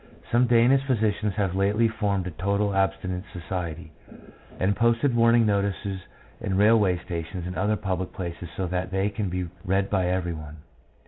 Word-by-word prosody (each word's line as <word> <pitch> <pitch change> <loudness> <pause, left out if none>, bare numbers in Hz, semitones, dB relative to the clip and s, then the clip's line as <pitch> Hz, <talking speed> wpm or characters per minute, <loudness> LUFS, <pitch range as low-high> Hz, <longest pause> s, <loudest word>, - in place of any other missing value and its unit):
Some 120 +1 +4
Danish 120 +3 +4
physicians 105 -4 0
have 100 -4 0
lately 105 +4 +3
formed 105 -4 -1
a 90 - -4
total 100 +4 0
abstinence 95 -1 -1
society, 85 -2 -5 0.7
and 95 - +2
have - - -1
posted 120 +3 +2
warning 115 0 +5
notices 100 -1 -1 0.4
in 95 - -2
railway 105 -3 +4
stations 85 +1 -5
and 90 0 -5
other 105 +1 +1
public 95 -3 -3
places 85 -2 -6
so 95 - -1
that 90 +1 -2
they 95 +2 0
can 105 -2 -2
be 90 0 -2 0.2
read 95 +1 0
by 95 -3 +2
every 90 -1 -1
one. 75 -1 -9
95 Hz, 170 wpm, -26 LUFS, 90-105 Hz, 0.7 s, warning